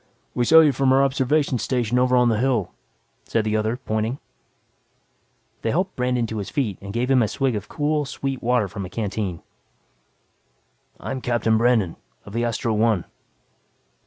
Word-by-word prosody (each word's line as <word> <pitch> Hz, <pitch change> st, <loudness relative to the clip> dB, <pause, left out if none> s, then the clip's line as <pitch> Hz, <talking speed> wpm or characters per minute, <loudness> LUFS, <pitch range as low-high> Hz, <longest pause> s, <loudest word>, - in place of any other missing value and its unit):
"We 120 Hz, -, 0 dB
saw 160 Hz, +5 st, +8 dB
you 150 Hz, -2 st, +5 dB
from 135 Hz, 0 st, +1 dB
our 135 Hz, +1 st, +5 dB
observation 140 Hz, 0 st, +1 dB
station 125 Hz, -1 st, 0 dB
over 125 Hz, 0 st, +3 dB
on 125 Hz, -1 st, +4 dB
the 110 Hz, -2 st, +1 dB
hill," 125 Hz, -6 st, 0 dB, 0.5 s
said 115 Hz, -, 0 dB
the 110 Hz, 0 st, -1 dB
other 110 Hz, +2 st, 0 dB
pointing. 110 Hz, 0 st, -2 dB, 1.4 s
They 115 Hz, -, -1 dB
helped 185 Hz, +9 st, -1 dB
Brandon 125 Hz, -1 st, 0 dB
to 110 Hz, -1 st, -4 dB
his 100 Hz, -, -5 dB
feet 115 Hz, -, -2 dB
and 100 Hz, 0 st, -7 dB
gave 120 Hz, +4 st, -1 dB
him 130 Hz, -2 st, +5 dB
a 110 Hz, -, +2 dB
swig 135 Hz, +1 st, -1 dB
of 105 Hz, -1 st, -5 dB
cool, 150 Hz, 0 st, 0 dB
sweet 135 Hz, -1 st, -4 dB
water 120 Hz, -3 st, +1 dB
from 100 Hz, +1 st, -6 dB
a 90 Hz, -, -6 dB
canteen. 100 Hz, -5 st, -3 dB, 1.6 s
"I'm 130 Hz, -1 st, -5 dB
Captain 120 Hz, -2 st, +1 dB
Brandon, 110 Hz, -6 st, +2 dB, 0.3 s
of 100 Hz, -, -11 dB
the 120 Hz, +1 st, 0 dB
Astro 115 Hz, -1 st, -1 dB
One." 110 Hz, -4 st, +1 dB
120 Hz, 170 wpm, -23 LUFS, 110-130 Hz, 1.6 s, saw